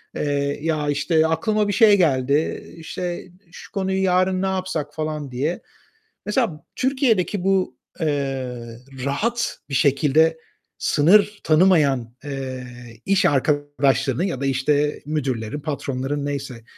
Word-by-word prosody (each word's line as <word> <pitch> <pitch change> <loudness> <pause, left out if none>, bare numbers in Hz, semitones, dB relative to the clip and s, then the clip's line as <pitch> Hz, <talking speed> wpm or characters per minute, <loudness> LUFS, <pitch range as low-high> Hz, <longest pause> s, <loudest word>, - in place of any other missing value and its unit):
Eee, 145 -1 -1
ya, 155 -2 -1
işte, 160 +3 +2
"Aklıma 210 +6 +1
bir 205 - 0
şey 210 -1 +6
geldi, 140 -3 +1
işte, 175 +2 -5 0.2
şu - - -12
konuyu 190 -2 -1
yarın 185 0 +2
ne - - 0
yapsak?" 185 -6 -3
falan 155 -3 -4
diye. 145 +8 -2 0.6
Mesela 210 - -1
Türkiye'deki 235 -8 +1
bu, 190 -1 +1 0.2
eee, 130 -6 -3 0.3
rahat 230 +12 -1
bir - - -7
şekilde 150 +4 +3 0.4
sınır 200 +7 +3
tanımayan, 150 -8 +3
eee, 130 -3 -5 0.4
iş 195 0 +3
arkadaşlarını 140 -1 +1
ya 165 -9 -3
da, - - -1
işte, 145 +2 +1
müdürlerin, 135 -4 -2
patronların 140 -1 -3
neyse, 135 -4 -5
150 Hz, 120 wpm, -22 LUFS, 140-185 Hz, 0.6 s, şey